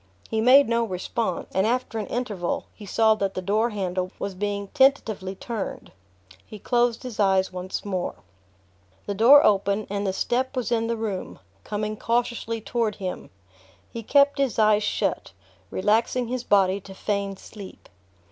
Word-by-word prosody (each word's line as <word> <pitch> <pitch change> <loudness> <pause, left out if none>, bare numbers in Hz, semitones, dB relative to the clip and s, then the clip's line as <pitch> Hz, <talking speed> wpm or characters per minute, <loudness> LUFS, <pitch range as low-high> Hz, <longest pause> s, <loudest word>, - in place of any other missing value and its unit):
He 220 -1 +1
made 265 +4 +7
no 235 0 +1
response, 185 -1 -3
and 190 +3 +2
after 245 -1 -1
an 210 - -4
interval 210 -8 -3
he 210 - -12
saw 220 +3 +4
that 200 -2 -2
the - - -2
door 215 +5 +1
handle 185 -3 -2
was 200 -1 -4
being 200 +1 -3
tentatively 225 -9 +2
turned. 220 0 -6 0.5
He 215 - -11
closed 240 +2 +1
his 250 -4 -7
eyes 190 -2 +2
once 185 +2 -5
more... 185 -3 -3 0.9
The 200 - -2
door 255 +8 +7
opened, 200 +1 +2
and 200 0 -1
the - - +1
step 250 +7 -1
was 250 - -2
in 230 -1 +1
the 230 0 -1
room, 210 -4 -4 0.3
coming 215 0 -3
cautiously 230 -1 -1
toward 220 0 -1
him. 185 -2 -6 0.6
He 230 - -5
kept 280 +5 +3
his 275 -4 0
eyes 215 -1 +4
shut, - - -2 0.4
relaxing 230 +4 +1
his 250 -1 -3
body 195 -2 +3
to 190 0 -12
feign 200 -1 -2
sleep. 200 -2 -12
215 Hz, 160 wpm, -25 LUFS, 195-235 Hz, 0.9 s, made